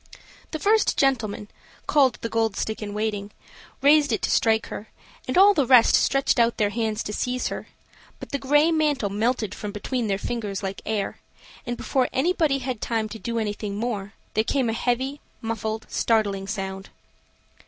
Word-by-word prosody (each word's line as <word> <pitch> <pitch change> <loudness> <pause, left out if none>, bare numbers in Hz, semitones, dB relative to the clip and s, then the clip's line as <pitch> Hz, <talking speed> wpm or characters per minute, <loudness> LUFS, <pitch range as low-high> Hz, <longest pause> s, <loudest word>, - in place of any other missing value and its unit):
The 315 - -3
first 430 +7 +2
gentleman, 220 -7 +1 0.4
called 270 -5 +3
the - - 0
Gold 225 -2 0
stick 220 0 -3
in 205 -1 -5
waiting, 210 -2 -2 0.5
raised 290 -1 +5
it 220 - -1
to - - +1
strike 220 -1 +3
her, 215 - -7 0.4
and 255 - -1
all 400 +2 +8
the 285 -8 +1
rest 245 -3 +6
stretched 275 -2 +3
out 235 0 +3
their 205 -1 +1
hands 220 -1 -1
to 210 - -5
seize 250 +3 -1
her; - - -6 0.5
but - - -9
the 280 - -1
gray 295 +4 +3
mantle 295 -10 +1
melted 215 0 0
from 210 0 -6
between 230 +3 -2
their 195 -1 0
fingers 210 -2 -4
like 195 0 -4
air; 210 -2 -2 0.5
and, 240 0 -2
before 260 -2 0
anybody 315 -1 +2
had 255 -4 -4
time 225 -2 -1
to 220 +1 -8
do 235 +1 -3
anything 210 -2 -3
more, 215 -3 -3 0.2
there 215 - +2
came 250 -1 0
a - - -3
heavy, 260 +5 -1 0.2
muffled, 220 -1 -3
startling 200 -4 0
sound. 195 -2 -5
225 Hz, 175 wpm, -24 LUFS, 210-265 Hz, 0.5 s, all